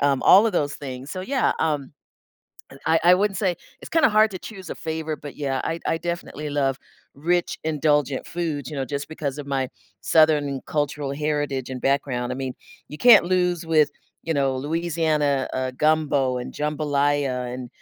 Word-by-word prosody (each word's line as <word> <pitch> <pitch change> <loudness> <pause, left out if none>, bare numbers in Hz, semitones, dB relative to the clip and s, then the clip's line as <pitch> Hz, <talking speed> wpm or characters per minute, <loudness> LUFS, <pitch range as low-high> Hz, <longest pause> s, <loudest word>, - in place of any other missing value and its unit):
um, 140 -2 +2
all 205 +4 +7
of 220 - 0
those 145 -5 0
things. 135 0 -7
So, 185 - -4
yeah, 260 +7 +1
um, 150 -3 -1 0.9
I 160 0 +4
I 180 +1 +8
wouldn't 195 +1 +1
say 185 -4 0 0.2
it's - - -9
kinda 325 -3 +4
hard 215 0 +4
to 185 - -5
choose 190 -3 -9
a - - -3
favorite, 160 -1 -4
but 145 -1 -8
yeah, 135 -2 -1
I 165 - -2
I 165 - +1
definitely 170 -3 -4
love 135 -2 0 0.4
rich, 175 +4 0
indulgent 150 -3 +1
foods, 155 -5 -3
you 150 - -6
know, 135 - -1
just 140 0 -4
because 150 -3 -4
of 145 - -6
my 135 -2 -1 0.3
Southern 150 -4 +3
cultural 145 -2 -2
heritage 145 -3 -2
and 130 - -5
background. 125 -3 0
I - - -2
mean, 130 -1 -4 0.3
you 150 - -8
can't 225 -8 +7
lose 180 -2 +1
with, 155 -2 +4 0.3
you 165 - -1
know, 135 -2 +1
Louisiana, 155 -2 0
uh, 130 0 -1
gumbo 145 -4 +2
and 125 - -6
jambalaya 145 -4 0
and, 125 -1 -6
150 Hz, 180 wpm, -23 LUFS, 140-165 Hz, 0.9 s, I